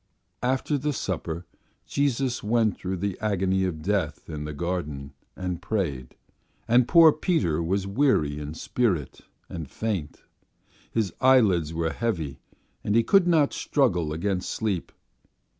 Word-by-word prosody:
After 130 +3 0
the 150 +2 -1
supper 85 - -3 0.4
Jesus 135 -3 0
went 110 -1 +2
through 95 +1 -4
the 100 +1 -3
agony 95 -3 +1
of 80 -4 -4
death 90 -6 -1
in 75 -1 -5
the 75 - -4
garden 75 -4 -4 0.2
and 90 -2 -4
prayed, 75 - -3 0.5
and 120 +1 +4
poor 165 -2 +8
Peter 155 - 0
was 95 +4 0
weary 100 - +1
in 75 +1 -6
spirit 90 - -1 0.3
and 80 -5 -7
faint, 100 -10 -4 0.7
his 110 -5 -1
eyelids 105 - +4
were 80 0 -1
heavy 80 - -2 0.4
and 105 - 0
he 115 - +5
could 195 - +4
not 160 -5 +3
struggle 90 - +1
against 90 +3 -2
sleep. 100 -6 -2
95 Hz, 135 wpm, -26 LUFS, 80-120 Hz, 0.7 s, poor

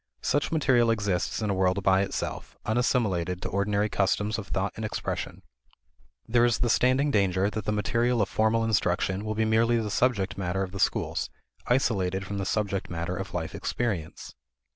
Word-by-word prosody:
Such 145 - +1
material 130 -7 +3
exists 100 -2 0
in 105 - 0
a - - +1
world 95 +1 +1
by 95 0 +4
itself, 100 - -4
unassimilated 105 -7 +1
to - - -3
ordinary 100 +1 +1
customs 105 +2 0
of 100 - -7
thought 100 +1 -1
and 110 - -6
expression. 110 - -4 0.8
There 120 +1 +3
is 120 -1 +3
the 120 - +1
standing 130 +4 +3
danger 100 -1 +2
that 110 -2 -4
the 105 - 0
material 115 +3 +1
of 105 - +2
formal 110 +2 +1
instruction 95 -2 0
will 110 0 -3
be 110 0 +1
merely 115 +2 +3
the 110 -2 -2
subject 100 -5 +1
matter 95 +1 -1
of 95 - -5
the 100 - -6
schools, - - 0 0.4
isolated 95 -7 +1
from 100 +1 -4
the 95 - -2
subject 100 -3 -1
matter 85 +1 -3
of 95 -1 -6
life 80 -2 -3
experience. 100 -10 -3
105 Hz, 180 wpm, -27 LUFS, 95-115 Hz, 0.8 s, by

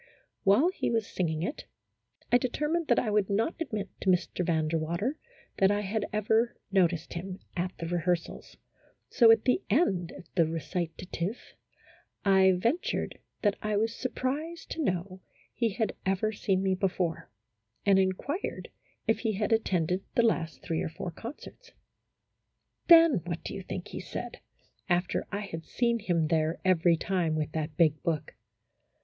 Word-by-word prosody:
While 210 - +5
he - - -2
was 225 -2 +1
singing 160 -5 -2
it, 280 - -4 0.7
I 245 - +6
determined 300 +6 -1
that - - +4
I 220 - +1
would 210 -1 +2
not 220 +10 +1
admit 215 -11 -3
to 195 - +1
Mr. 180 0 +1
Van 160 -3 +1
der 165 +1 0
Water 170 - -2 0.4
that 195 - +5
I 205 0 +1
had 205 +1 -2
ever 220 +3 +1
noticed 180 -4 +2
him 185 +2 -5 0.2
at 180 +1 -2
the 165 - -5
rehearsals, 175 0 -2 0.5
so, 235 -3 +6
at 225 -1 +6
the 255 +9 +3
end 195 - +2
of - - -13
the 165 -3 +3
recitative, 170 +4 -4 0.7
I 190 -1 +6
ventured 235 - -1 0.2
that 205 -1 +2
I 215 -1 0
was 225 +2 +1
surprised 290 +7 -3
to 325 - -2
know 185 - -2 0.3
he 230 -2 +1
had 220 +2 -1
ever 195 +3 +1
seen 195 -2 0
me 190 -1 +2
before, 180 -3 -1 0.6
and 195 -1 +5
inquired 190 - -2 0.4
if 225 - +2
he 225 -2 0
had 210 +3 0
attended 185 -4 +1
the 235 - +4
last 170 -8 0
three 165 -2 -1
or - - -2
four 170 +2 -6
concerts. 290 - -10 1.1
Then 330 - +8
what 170 -1 -4
do - - -5
you 195 - -5
think 180 -1 -6
he - - -6
said - - -6 0.5
(after 175 0 0
I 200 0 -2
had 165 -5 -6
seen 235 +3 0
him 170 -7 0
there 160 0 +1
every 175 -2 +4
time 170 -3 0
with 155 0 -2
that 155 0 -4
big 155 -3 +3
book)? 155 -2 -2
190 Hz, 160 wpm, -29 LUFS, 170-225 Hz, 1.1 s, Then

